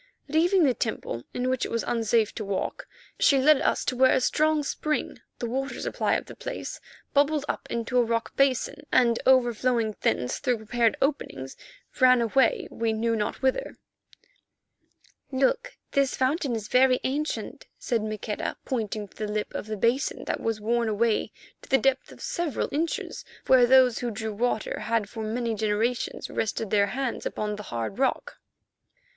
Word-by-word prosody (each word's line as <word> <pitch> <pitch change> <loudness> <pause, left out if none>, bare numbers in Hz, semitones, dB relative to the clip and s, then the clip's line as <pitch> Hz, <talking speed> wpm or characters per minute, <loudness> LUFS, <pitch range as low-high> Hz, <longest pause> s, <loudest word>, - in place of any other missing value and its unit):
Leaving 340 +5 +3
the 270 -4 +4
temple 220 - -3
in 250 +1 -2
which 255 -1 0
it - - -2
was 230 - -1
unsafe 225 -2 +1
to 220 - -5
walk, 200 -1 -3 0.3
she 275 - +5
led 285 +2 +5
us - - +1
to 255 - -1
where 260 +1 +5
a - - +3
strong 305 +3 +2
spring, 305 +2 -2 0.2
the - - -4
water 270 +4 -3
supply - - 0
of - - -2
the - - -10
place, - - -6 0.3
bubbled 290 +1 +2
up - - -3
into 235 +2 0
a - - +5
rock 230 0 -2
basin, 275 +2 +1
and 235 -2 +3
overflowing 240 -3 +3
thence 125 - 0
through 250 -4 +1
prepared 225 +1 +1
openings, 270 - -2 0.4
ran 255 -1 +6
away 235 +2 +2
we 225 -1 -1
knew 230 +1 0
not 215 +4 -3
whither. 265 - 0 1.5
"Look, 485 - 0
this 275 -1 +2
fountain 265 -1 0
is 215 -2 -5
very 255 +1 +4
ancient," 295 +4 -3
said 235 -3 -1
Maqueda, 215 0 -4
pointing 215 -4 -3
to - - -23
the 215 -1 -3
lip 210 0 -3
of - - -5
the 215 -1 -4
basin 235 +7 0
that - - -2
was 225 -1 -2
worn 230 +2 0
away 220 +1 +1 0.3
to - - -16
the 270 - +5
depth 270 +2 0
of - - -14
several 340 -5 -2
inches 320 +3 -2 0.2
where 255 -2 +6
those 255 -2 +5
who 245 - -2
drew 220 0 -4
water 225 +1 -1
had 230 -3 0
for 220 +2 -7
many 230 +1 -1
generations 220 +3 -1
rested 220 -1 -2
their 200 -1 +4
hands 260 +3 -3
upon 210 0 -3
the 210 - -7
hard 120 - -4
rock. 270 - 0
240 Hz, 170 wpm, -26 LUFS, 220-265 Hz, 1.5 s, ran